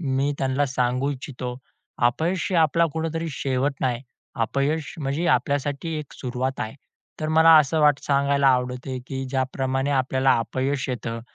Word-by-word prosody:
मी 140 -2 0
त्यांना 135 +2 +1
सांगू 130 +1 0
इच्छितो, 130 -2 -5 0.5
अपयश 165 +8 -1
हे 180 - +1
आपला 165 +1 +4
कुठेतरी 165 +1 -2
शेवट 135 0 -1
नाही, 125 -1 -1 0.4
अपयश 140 +5 -1
म्हणजे 145 +3 -1
आपल्यासाठी 145 +2 -2
एक 150 -2 -8
सुरुवात 130 +1 -3
आहे. 110 +1 -4 0.5
तर 155 - -1
मला 160 +1 +6
असं 155 +2 +2
वाट 150 -2 +5
सांगायला 140 0 +2
आवडते, 125 0 0
की 135 -1 -4
ज्याप्रमाणे 135 +1 -1
आपल्याला 130 0 +2
अपयश 135 +4 -2
येतं, 115 -2 -4
135 Hz, 145 wpm, -24 LUFS, 130-150 Hz, 0.5 s, मला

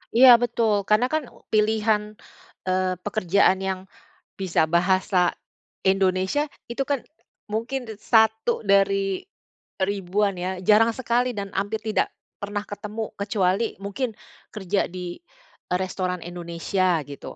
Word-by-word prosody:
Iya 245 -1 +9
betul, 235 -2 +1
karena 225 +4 +3
kan 310 -1 +1 0.3
pilihan, 215 0 +1 0.5
eee, 185 0 +1
pekerjaan 200 -2 +2
yang 190 -1 -2 0.6
bisa 185 -4 +2
bahasa 180 0 +2 0.5
Indonesia 190 +8 +2 0.2
itu 255 +3 -1
kan 285 -2 +1 0.5
mungkin 245 +5 -2
d 220 - -7
1 220 +1 +3
dari 195 -1 +2 0.6
ribuan 195 +1 0
ya, 185 +1 -3
jarang 215 +4 +5
sekali 245 0 +1
dan 200 -1 -5
hampir 205 +3 -1
tidak 220 -1 +1 0.3
pernah 205 0 -3
ketemu, 210 +2 -5
kecuali 200 +1 0
mungkin 220 +4 -3 0.4
kerja 200 -1 0
di, 180 -1 -6 0.5
eee, 180 - +3
restoran 185 -1 -2
Indonesia 175 0 -1
gitu. 140 -1 -9
200 Hz, 120 wpm, -24 LUFS, 185-220 Hz, 0.6 s, Iya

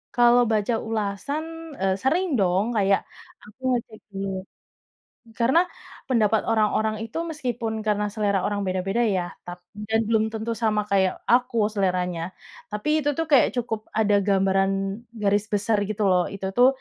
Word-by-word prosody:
Kalau 240 0 +6
baca 215 +2 +1
ulasan, 285 +10 -4
eee, 190 0 +2
sering 340 +8 +2
dong 190 +1 +2
kayak 195 -1 +3 0.4
aku 215 +4 -17 0.2
ngecek 225 -2 -6 0.2
dulu. 195 0 -3 1.1
Karena 250 +8 +4 0.5
pendapat 220 -3 +3
orang-orang 215 0 +2
itu 225 +7 -7
meskipun 245 -7 -3
karena 210 -1 +1
selera 205 -3 +1
orang 205 -1 -1
beda-beda 190 +5 0 0.2
ya 175 -1 -2 0.2
tap 175 0 -7 0.3
dan 225 0 +3
belum 220 -1 +2
tentu 220 +1 -3
sama 215 -2 +1
kayak 190 -2 +3 0.2
aku 245 0 +3 0.2
seleranya, 180 -3 0 0.5
tapi 210 +8 -2 0.2
itu - - +3
tuh 325 - 0
kayak 275 - +6
cukup 225 -2 -1 0.2
ada 210 -1 +3
gambaran 195 0 +3 0.5
garis 205 +1 +2
besar 205 +2 +1
gitu 215 0 -1
loh, 180 -1 +4
itu 195 -1 -5
tuh 250 +1 +7
215 Hz, 145 wpm, -24 LUFS, 195-240 Hz, 1.1 s, tuh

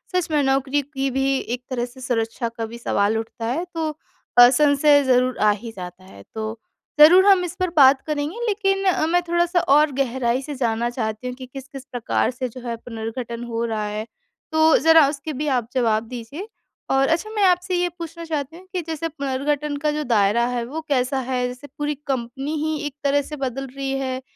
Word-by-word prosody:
सच 360 -3 +1
में 295 -1 +3
नौकरी 270 +1 +1
की 275 -1 -3
भी 270 +1 +1
एक 245 +2 -5
तरह 245 -2 -1
से 255 +1 -14
सुरक्षा 230 -1 -2
का 230 -1 -5
भी 235 +1 -9
सवाल 215 -2 +1
उठता 225 0 -5
है 300 +10 -1
तो 320 -1 -1 0.5
अ, 245 0 +10
संशय 285 +1 +4
ज़रूर 255 -1 +2
आ 210 - +6
ही 230 - -6
जाता 180 0 -9
है। 100 - -14
तो 220 +1 -4 0.4
ज़रूर 360 +6 +8
हम 385 -3 +6
इस 350 +1 -6
पर 365 -1 +1
बात 270 -1 +7
करेंगे 305 +11 -2
लेकिन 390 -2 +1
अ, 355 -4 +2
मैं 355 +1 +2
थोड़ा-सा 345 +1 +2
और 300 0 +4
गहराई 260 -1 0
से 290 +1 -6
जानना 235 -2 0
चाहती 220 0 -4
हूँ 250 - -4
कि 260 0 -9
किस-किस 270 +1 -10
प्रकार 245 +1 0
से 255 0 -4
जो 255 +2 -10
है 230 - -2
पुनर्गठन 230 +1 -6
हो 230 -1 -3
रहा 215 -2 -2
है 210 +1 -4 0.5
तो 315 0 +5
ज़रा 320 -1 +6
उसके 295 +1 -5
भी 300 +3 -3
आप 235 -2 -3
जवाब 225 -4 +2
दीजिए? 250 - -7 0.4
और 270 0 +3
अच्छा 340 +7 0
मैं 410 - +2
आपसे 360 0 +1
ये 355 0 +1
पूछना 335 0 -7
चाहती 310 0 -4
हूँ 370 - -15
कि 360 - -1
जैसे 325 0 -3
पुनर्गठन 285 +1 -2
का 300 - +2
जो 300 0 -2
दायरा 230 0 +2
है 245 -1 -2
वो 310 +6 -5
कैसा 265 -1 +1
है? 250 -1 -1
जैसे 250 +3 -9
पूरी 295 0 -1
कंपनी 270 +3 -3
ही 315 0 -1
एक 290 -1 -5
तरह 285 0 +3
से 300 +2 -7
बदल 270 -1 -4
रही 270 -1 -3
है 260 -1 -3
270 Hz, 205 wpm, -22 LUFS, 240-305 Hz, 0.5 s, अ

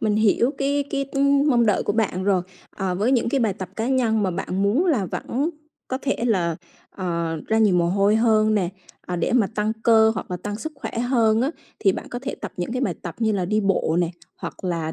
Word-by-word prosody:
mình 210 -1 +1
hiểu 220 +3 +3
cái 280 +1 +1
cái, 275 -1 -1
ưm, 280 +1 +3
mong 235 -3 +4
đợi 210 - +2
của - - -1
bạn 200 -4 0
rồi. 190 -3 +2 0.3
Ờ, 190 -2 -2
với 215 +8 +1
những 240 -2 +2
cái 270 +3 +1
bài 220 -4 +2
tập 185 -1 -6
cá 225 +1 -1
nhân 230 -5 +2
mà 190 - +1
bạn 185 +2 -2
muốn 245 - +2
là 245 - +2
vẫn 275 - -2 0.4
có 260 - -2
thể 275 - 0
là, 175 -8 +1 0.3
ờ, 170 -3 -2
ra 220 - +2
nhiều 210 -4 +4
mồ 170 -1 +3
hôi 200 +3 +3
hơn 220 -1 +3
nè, 190 -5 +1 0.4
ờ, 180 - -3
để 170 - 0
mà 235 -5 +4
tăng 215 +1 0
cơ 220 -1 +5
hoặc - - -6
là 180 - -2
tăng 205 +3 -5
sức 310 +8 -6
khỏe 270 - -6
hơn 230 -3 +2
á 265 +4 +1 0.3
thì 195 - +3
bạn - - -6
có 245 - -4
thể 275 - -3
tập - - -7
những 180 +6 -3
cái 255 - -1
bài - - 0
tập - - -6
như 220 -2 +1
là 195 -3 0
đi 215 +4 +1
bộ 195 -4 +1
nè, 175 -1 0 0.3
hoặc - - -8
là, 165 -3 -2
215 Hz, 245 wpm, -23 LUFS, 185-245 Hz, 0.4 s, cơ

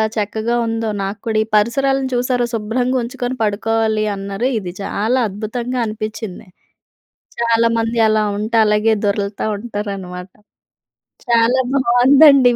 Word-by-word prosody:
చక్కగా 220 +2 -1
ఉందో 225 0 -2
నాకు 200 +2 -4
కూడా. 220 -1 0
ఈ - - -10
పరిసరాలను 270 +5 +2
చూసారు 245 0 +1
శుభ్రంగా 245 +4 -1
ఉంచుకొని 245 +1 -4
పడుకోవాలి 220 +1 0
అన్నారు. 195 +4 -3
ఇది 180 -4 -5
చాలా 220 +6 0
అద్భుతంగా 235 +5 -4
అనిపిచింది. 215 -2 -6 0.9
చాలామంది 230 0 +1
అలా 215 0 +2
ఉంటే 215 +3 -2
అలాగే 210 +1 +2
దొర్లుతూ 200 0 -1
ఉంటారనమాట. 195 -4 -6 1.0
చాలా 235 +2 +3
బావుందండి 265 +1 +6
225 Hz, 110 wpm, -18 LUFS, 210-245 Hz, 1.0 s, బావుందండి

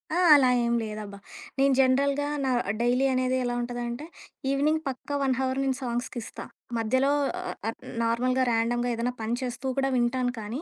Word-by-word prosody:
ఆ! - - +1 0.2
అలా 265 -3 +6 0.2
ఏం 235 - +1
లేదబ్బా! 210 -2 -6 0.4
నేను 275 0 +4
జనరల్‌గా 280 +2 +3 0.2
నా 265 - +1 0.3
డైలీ 250 +3 +2
అనేది 255 0 +1
ఎలా 245 0 -1
ఉంటదంటే 240 +3 -4 0.5
ఈవినింగ్ 305 +3 +2
పక్కా 275 +2 -5
1 265 -1 +2
హవర్ 260 0 0
నేను 265 -1 0
సాంగ్స్‌కిస్తా. 240 -1 -4 0.3
మధ్యలో 260 +5 +2 0.3
ఆహ్, 365 - -5
అన్ - - -6 0.3
నార్మల్‌గా, 250 +3 +1
ర్యాండమ్‌గా 240 +2 +1
ఏదన్నా 245 +2 -1
పని 225 +2 -1
చేస్తూ 250 +1 -4
కూడా 270 0 +1
వింటాను 245 +1 +1
కానీ, 225 +8 -5
250 Hz, 160 wpm, -27 LUFS, 235-270 Hz, 0.5 s, అలా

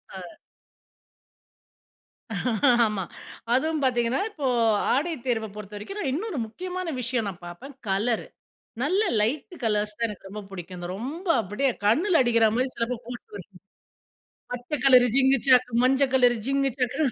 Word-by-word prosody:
ஆ. - - -6 2.7
ஆமா. 210 -3 -2 0.5
அதுவும் 310 +4 +1
பார்த்தீங்கன்னா, 245 +2 +1
இப்போ 305 -10 -6 0.5
ஆடை 315 +6 0
தேர்வ 225 -3 0
பொறுத்தவரைக்கும் 210 - -7
நான் 275 -9 -1
இன்னொரு 370 +1 -3
முக்கியமான 365 +8 -5
விஷயம் 235 -2 -1
நான் 180 -2 -10
பார்ப்பேன், 250 +11 -10
கலரு. 215 +5 0 0.6
நல்ல 375 +9 +2 0.2
லைட்டு 290 - -1
கலர்ஸ 210 -1 0
தான் 230 - +1
எனக்கு 205 -2 -9
ரொம்ப 210 +2 -6
பிடிக்கும். 180 -1 -8
இந்த 175 0 -6
ரொம்ப 300 - -6
அப்படியே 210 +7 0 0.2
கண்ணில 330 - +4
அடிக்கிறா 230 -3 +4
மாரி 255 +2 +1
சில 230 - 0
பேரு 250 -1 -4
போட்டு 245 -3 -9
வர்றது. 195 0 -11 1.0
பச்சை 245 +5 -4
கலரு 255 -2 +7
ஜிங்குச்சான், 265 -2 +4 0.2
மஞ்ச 265 +2 +4
கலரு 245 -2 +4
ஜிங்கு 275 0 +1
சாக்குனு. 265 +4 +1
250 Hz, 135 wpm, -25 LUFS, 215-280 Hz, 2.7 s, கலரு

